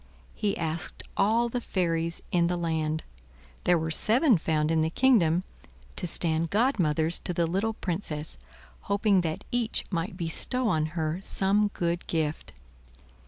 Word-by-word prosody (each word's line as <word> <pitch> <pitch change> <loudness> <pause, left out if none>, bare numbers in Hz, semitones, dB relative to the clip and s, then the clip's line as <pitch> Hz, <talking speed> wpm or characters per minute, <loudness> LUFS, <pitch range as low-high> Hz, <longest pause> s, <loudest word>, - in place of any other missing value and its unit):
He 205 -2 -1
asked 160 0 -3
all 225 +4 +3
the 245 +1 -3
fairies 170 -5 -1
in 170 -1 +3
the 175 0 -1
land—there 155 - -2
were 160 0 -2
seven 230 - +4
found 155 -1 0
in 160 -1 +2
the 160 - +1
kingdom—to 180 -4 0
stand 165 0 +1
godmothers 175 - +1
to 180 - -4
the 170 - +2
little 195 +7 -1
Princess; 165 - -4 0.5
hoping 200 -1 +3
that 160 -2 -3
each 240 -2 +3
might 180 0 -3
bestow 220 +9 -1
on 155 -5 +1
her 160 +2 -1
some 200 +2 +2
good 170 0 -2
gift. 155 -2 -2
170 Hz, 135 wpm, -27 LUFS, 160-200 Hz, 0.5 s, seven